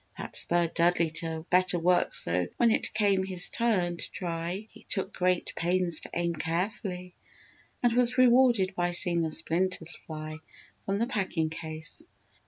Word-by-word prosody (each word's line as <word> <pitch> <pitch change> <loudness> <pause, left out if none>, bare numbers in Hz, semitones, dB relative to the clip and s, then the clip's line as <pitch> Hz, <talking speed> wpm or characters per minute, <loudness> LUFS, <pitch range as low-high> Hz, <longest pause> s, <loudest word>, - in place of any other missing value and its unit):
That - - -7
spurred 170 -1 +3
Dudley 170 -1 +2
to 160 -1 -2
better 180 0 +3
work 175 +1 +2
so 90 +1 0
when 235 -1 +4
it - - 0
came 200 -3 +2
his 185 -1 -1
turn 185 -7 0
to - - -6
try 175 +3 -4
he - - -16
took 190 0 -1
great 180 0 0
pains 175 -1 +1
to - - -8
aim 170 0 0
carefully 180 +2 -3 0.7
and 240 -1 +3
was 250 +1 +3
rewarded 240 -6 +4
by 175 0 0
seeing 175 -1 +2
the 160 - 0
splinters 165 +2 -1
fly 155 0 -6 0.5
from 195 0 0
the 230 - +1
packing 190 -9 -1
case. 160 - -6
180 Hz, 160 wpm, -28 LUFS, 165-195 Hz, 0.7 s, when